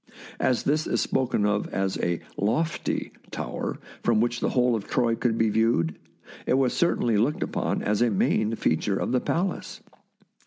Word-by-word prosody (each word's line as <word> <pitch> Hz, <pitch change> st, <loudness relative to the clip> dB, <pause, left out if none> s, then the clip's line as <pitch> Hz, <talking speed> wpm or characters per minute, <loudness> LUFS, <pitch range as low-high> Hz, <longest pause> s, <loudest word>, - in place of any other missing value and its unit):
As 125 Hz, -, +1 dB
this 150 Hz, +2 st, +1 dB
is -, -, 0 dB
spoken 120 Hz, -5 st, +1 dB
of 105 Hz, 0 st, +1 dB
as 95 Hz, 0 st, -1 dB
a 85 Hz, -1 st, -1 dB
" -, -, -31 dB, 0.2 s
lofty 160 Hz, +4 st, -1 dB
' -, -, -25 dB
tower, -, -, -4 dB, 0.2 s
from 115 Hz, -2 st, +2 dB
which 120 Hz, +1 st, +1 dB
the -, -, 0 dB
whole 125 Hz, -1 st, +2 dB
of 105 Hz, -, -5 dB
Troy 120 Hz, -2 st, +1 dB
could 115 Hz, -1 st, 0 dB
be 110 Hz, -1 st, +3 dB
viewed, 105 Hz, -7 st, +2 dB, 0.5 s
it -, -, +3 dB
was 130 Hz, -2 st, +2 dB
certainly 120 Hz, -10 st, +2 dB
looked 120 Hz, +8 st, +1 dB
upon -, -, -2 dB
as 105 Hz, +1 st, +1 dB
a 120 Hz, -, +4 dB
main 110 Hz, +2 st, +1 dB
feature 95 Hz, +1 st, 0 dB
of -, -, -2 dB
the 125 Hz, -1 st, +2 dB
palace. 185 Hz, +3 st, -2 dB
115 Hz, 185 wpm, -26 LUFS, 105-125 Hz, 0.5 s, a